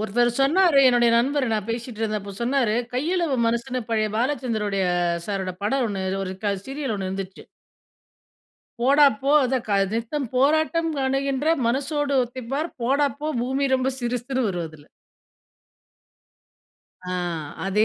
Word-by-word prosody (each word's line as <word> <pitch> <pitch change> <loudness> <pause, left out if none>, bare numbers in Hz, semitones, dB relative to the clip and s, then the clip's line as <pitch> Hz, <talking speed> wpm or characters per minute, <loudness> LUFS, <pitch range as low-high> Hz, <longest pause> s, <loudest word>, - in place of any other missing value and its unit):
ஒருத்தர் 235 +3 +2
சொன்னாரு, 320 +1 +4
என்னுடைய 240 -2 +4
நண்பர் 275 +3 +1
நான் 215 -2 -1
பேசிட்டு 235 -1 -5
இருந்தப்போ 210 -2 -3
சொன்னாரு. 245 -3 +1 0.2
கையளவு 320 +2 0
மனசுன்னு, 240 +2 -1
பழைய 215 -1 +1
பாலச்சந்தருடுய 225 -6 -1 0.4
சாரோட 190 -2 -2
படம் 255 +4 +1
ஒண்ணு 195 -2 -3 0.2
ஒரு 185 - -4
க 200 -1 +1
சீரியல் 270 -3 -3
ஒண்ணு 190 -1 -3
இருந்துச்சு. 190 0 -6 1.4
போடாப்போ, 275 0 +4
அதான் 255 -1 -1
க - - 0 0.2
நித்தம் 235 +4 -2
போராட்டம் 315 +5 +2
காணுகின்ற 270 +1 0 0.2
மனசோடு 280 +3 0
ஒத்தி 250 +2 -8
பார். 310 +4 -2
போடாப்போ 280 +3 0 0.2
பூமி 265 +3 0
ரொம்ப 260 0 +1
சிறுசுன்னு 245 +1 -1
வரும் 175 -3 -3
அதுல. 155 -2 -16 2.3
ஆ - - -2 0.5
அதே 210 +3 +3
250 Hz, 125 wpm, -24 LUFS, 215-275 Hz, 2.3 s, சொன்னாரு